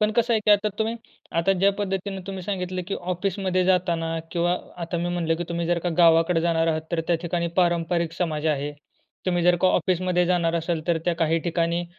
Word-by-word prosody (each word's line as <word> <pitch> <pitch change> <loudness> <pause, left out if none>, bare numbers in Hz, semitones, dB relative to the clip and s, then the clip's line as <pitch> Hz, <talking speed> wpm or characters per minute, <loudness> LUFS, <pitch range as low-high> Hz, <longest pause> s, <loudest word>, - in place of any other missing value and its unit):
पण 215 0 +3
कसं 235 0 +3
आहे 220 - +2
की - - +6
आता 205 +1 +4
तुम्ही 220 +1 0 0.4
आता 180 +4 +3
ज्या 195 +2 +3
पद्धतीनं 195 -1 -3
तुम्ही 190 -2 -5
सांगितलं 185 -1 -3
की 200 - -1
ऑफिसमध्ये 185 +1 -1
जाताना 170 -3 +1
किंवा 175 +1 +1 0.3
आता 170 +1 -3
मी 175 +1 -1
म्हटलं, 170 -2 0
की 175 - -3
तुम्ही 170 0 -2
जर 175 0 +1
का 175 - -2
गावाकडे 165 0 +5
जाणार 165 -1 +1
आहात, 160 -1 +1
तर 165 - +1
त्या 170 - +2
ठिकाणी 170 0 -1
पारंपरिक 170 -1 +1
समाज 160 -3 -2
आहे. 145 -1 0 0.5
तुम्ही 175 -1 +1
जर 175 0 +4
का 185 - +4
ऑफिसमध्ये 180 0 +1
जाणार 170 -2 +1
असाल 165 -1 -1
तर 170 -2 +2
त्या 175 -1 +1
काही 165 -1 +2
ठिकाणी 170 0 0
175 Hz, 205 wpm, -24 LUFS, 165-185 Hz, 0.5 s, की